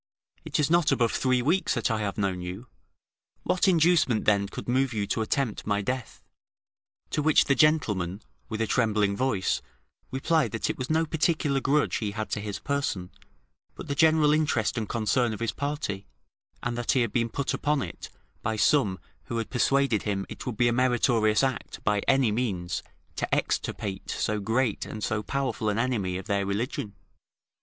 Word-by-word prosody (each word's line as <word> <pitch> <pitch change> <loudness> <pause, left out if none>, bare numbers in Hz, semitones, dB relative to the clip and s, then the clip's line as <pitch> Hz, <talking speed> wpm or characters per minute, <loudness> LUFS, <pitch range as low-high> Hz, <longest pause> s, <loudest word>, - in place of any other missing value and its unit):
It - - -2
is 150 +1 +2
not 170 -3 +4
above 120 -4 +2
three 130 -1 +1
weeks 170 +8 +1
that - - 0
I 110 - 0
have 100 -2 -3
known 95 -3 -1
you; 90 +7 -6 0.8
what 185 +2 +2
inducement, 165 - +3
then, 100 -1 +3
could - - -8
move 130 +1 +1
you 105 -2 -1
to 110 - -1
attempt 115 -1 -1
my 105 -1 +1
death?" 125 +3 -4 0.9
To 150 - 0
which 155 +1 +4
the 140 - +3
gentleman 105 - +2 0.3
with 110 -1 -3
a - - +2
trembling 105 -4 +1
voice 100 - 0 0.5
replied, 135 -3 +1
"That 115 - 0
it - - -9
was 130 - -3
no 160 +1 +2
particular 155 -3 +1
grudge 140 +2 +1
he 105 -3 -3
had 110 0 -4
to 105 - -1
his 105 -1 -4
person, 140 -11 -2 0.6
but - - -8
the 140 - -1
general 155 0 +4
interest 145 -9 +1
and 110 -3 -3
concern 115 +1 +1
of - - -10
his 115 -1 -1
party, 140 -9 -3 0.6
and 120 -1 -1
that 120 - +1
he 130 - +3
had 115 -3 -1
been 115 -1 +1
put 140 +3 -2
upon 145 -2 0
it - - -8 0.3
by 110 - -1
some 105 -1 +3 0.3
who 115 - -4
had 115 - -3
persuaded 135 -3 +2
him 100 -2 -2
it - - -8
would 120 -4 -3
be 120 - +4
a 120 - +2
meritorious 120 -3 +3
act, 130 -1 -2
by 105 -1 +2
any 135 -4 +4
means, 95 -8 -2 0.4
to - - -2
extirpate 95 -2 -2
so 105 0 -1
great 110 +2 0
and 110 - -7
so 110 -1 0
powerful 130 -2 -2
an 105 - -1
enemy 110 -7 0
of 95 - -7
their 100 -1 0
religion." 100 +1 -3
115 Hz, 185 wpm, -27 LUFS, 105-140 Hz, 0.9 s, not